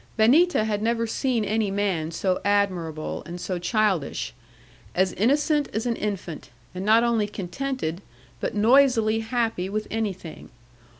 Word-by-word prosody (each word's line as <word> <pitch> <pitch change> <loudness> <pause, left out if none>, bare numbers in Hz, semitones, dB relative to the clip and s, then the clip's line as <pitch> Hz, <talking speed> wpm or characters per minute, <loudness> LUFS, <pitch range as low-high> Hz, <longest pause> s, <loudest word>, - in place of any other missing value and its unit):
Benita 270 +6 +5
had 210 -1 -1
never 230 +1 +1
seen 235 -1 0
any 215 0 0
man 195 -5 -1
so 185 +3 -1
admirable, 185 -6 0
and 175 +1 -7
so 180 0 -3
childish. 185 - 0 0.6
As 185 +1 +2
innocent 290 - +2
as 220 +3 -2
an 235 -1 0
infant; 195 -7 -5 0.2
and 185 +1 -5
not 220 +3 +5
only 230 -3 +1
contented, 205 -2 -4 0.4
but - - -3
noisily 225 -1 +4
happy 225 -5 -1
with 215 +1 -2
anything. 200 -7 -4
215 Hz, 135 wpm, -25 LUFS, 185-230 Hz, 0.6 s, Benita